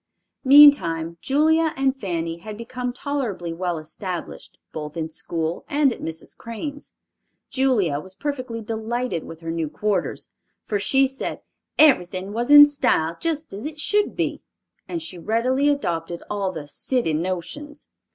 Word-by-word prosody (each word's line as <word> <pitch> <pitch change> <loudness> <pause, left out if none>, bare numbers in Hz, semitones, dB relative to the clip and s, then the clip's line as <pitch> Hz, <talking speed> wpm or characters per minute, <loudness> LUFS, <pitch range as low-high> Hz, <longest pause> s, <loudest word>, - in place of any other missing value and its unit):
Meantime 180 - +6
Julia 315 +3 +2
and 270 0 +2
Fanny 170 -8 -3
had 210 +3 -8
become 250 +2 -4
tolerably 245 -11 -3
well 175 0 -2
established 175 +3 -7 0.2
both 150 +1 -6
in 160 -1 -2
school 165 +1 -3
and 285 -3 +3
at - - -12
Mrs. 160 0 -6
Crane's. 285 +6 -7 0.6
Julia 220 - +2
was 190 +4 -10
perfectly 255 -3 -4
delighted 225 -3 -2
with 165 0 -10
her 165 0 -4
new 165 -2 -2
quarters, 205 +7 -2 0.4
for 205 - -1
she 270 +6 +3
said 270 0 -4 0.4
"everything 190 - +3
was 235 +3 -2
in 290 0 +11
style, 170 - +1
just 315 -4 -2
as 210 +8 -5
it 305 -1 -8
should 415 +6 +1
be," - - -2 0.5
and 335 -2 -4
she 185 - -7
readily 250 - +1
adopted 170 - -2
all 200 -2 -1
the 155 -5 -7
"city 235 - -1
notions." 185 - -4
220 Hz, 145 wpm, -23 LUFS, 170-280 Hz, 0.6 s, in